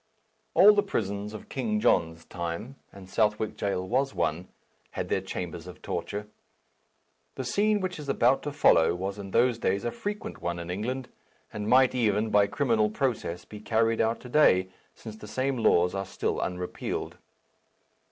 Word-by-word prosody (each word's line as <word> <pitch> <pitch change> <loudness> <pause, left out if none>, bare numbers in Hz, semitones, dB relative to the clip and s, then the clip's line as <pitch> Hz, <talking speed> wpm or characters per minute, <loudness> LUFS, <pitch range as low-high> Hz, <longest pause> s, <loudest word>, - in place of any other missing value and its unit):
All 195 +5 +8
the 205 - +3
prisons 105 - -3
of 110 - -9
King 215 -2 -1
John's 85 - +1
time 85 +9 -5 0.2
(and 95 -2 -12
Southwark 105 +1 0
Jail 95 -2 -2
was 130 +1 0
one) 85 +1 -1 0.5
had - - -4
their - - +1
chambers 85 -1 -6
of 90 - -11
torture. 105 +1 -4 1.1
The 130 - -4
scene 210 - +2
which 185 -3 -3
is 145 -2 -7
about 130 0 +3
to 145 - -4
follow 85 - +4
was 95 +3 -4
in 100 -1 -7
those 120 +3 +2
days 100 -1 0
a 120 - 0
frequent 205 - -5
one 85 0 -2
in 85 0 -5
England, 125 +7 -3 0.5
and 105 0 -3
might 130 +1 +5
even, 110 -3 +1
by 100 -1 +5
criminal 115 -6 +1
process, 105 -8 -2
be 105 - -10
carried 115 +1 +1
out 115 +1 +1
to 125 - -10
day, 95 -10 +4 0.3
since 110 -2 -9
the 105 - -10
same 130 +5 -1
laws 90 -5 +3
are 95 -1 -3
still - - -2
unrepealed. 90 0 -4
105 Hz, 170 wpm, -28 LUFS, 95-130 Hz, 1.1 s, All